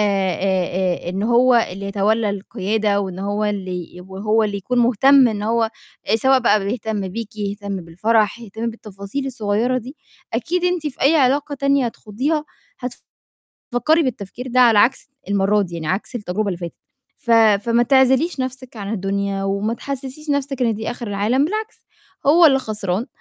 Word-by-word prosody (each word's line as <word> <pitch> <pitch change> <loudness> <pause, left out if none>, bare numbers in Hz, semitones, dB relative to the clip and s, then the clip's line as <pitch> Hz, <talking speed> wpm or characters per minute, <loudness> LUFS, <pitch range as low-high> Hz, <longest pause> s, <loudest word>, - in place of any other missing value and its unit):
آآ، 190 -2 0
آآ، - - -2
إن 190 +3 -2
هو 240 +3 +4 0.2
اللي 195 +2 -6
يتولّى 210 +2 +1
القيادة، 205 +1 -1
وإن 190 -2 -5
هو 205 +2 -1
اللي 185 -5 -4
يبقى 190 +2 -9
هو 220 +1 +3
اللي 205 -1 -1
يكون 245 +6 -2
مهتم 255 +3 +5
إن 210 -2 -3
هو 230 +2 +1 0.4
آآ، 215 - +3
سواء 265 +4 +4
بقى 215 -5 +2
بيهتم 210 -2 -3
بيكِ، 220 +2 -7
يهتم 200 -1 -4
بالفَرَح، 205 +6 0
يهتم 225 +1 -5
بالتفاصيل 210 +4 -6
الصغيّرة 235 +1 0
دي، 255 +6 -10 0.4
أكيد 345 +10 -1
أنتِ 355 -3 0
في 290 - -6
أي 290 +5 +5
علاقة 285 +1 +2
تانية 275 -1 +2
هتخوضيها 260 +8 -2 1.1
هتفكّري 305 +7 +1
بالتفكير 250 -2 -5
ده 255 +1 +2
على 230 -4 +6
عكس 245 +6 +2 0.2
المرّة 200 +1 +2
دي 175 -3 -6
يعني 165 -2 -5
عكس 190 +9 -2
التجربة 210 -2 -2
اللي 180 - -3
فاتت، 170 -1 -6 0.4
ف 235 - -6 0.4
فما 235 +1 +3
تعزليش 265 +5 +3
نَفْسِك 255 -1 -5
عن 200 0 -5
الدنيا، 200 -1 -2
وما 200 +3 -1
تحسِّسِيش 275 +3 -6
نفْسِك 280 -2 -1
إن 230 -2 +2
دي 220 +2 -4
آخر 240 -1 -6
العالم، 210 +7 +1
بالعكس 430 +6 -4 0.4
هو 330 +4 +7
اللي 270 -3 +5
خسران 215 -3 -3
220 Hz, 165 wpm, -20 LUFS, 200-255 Hz, 1.1 s, هو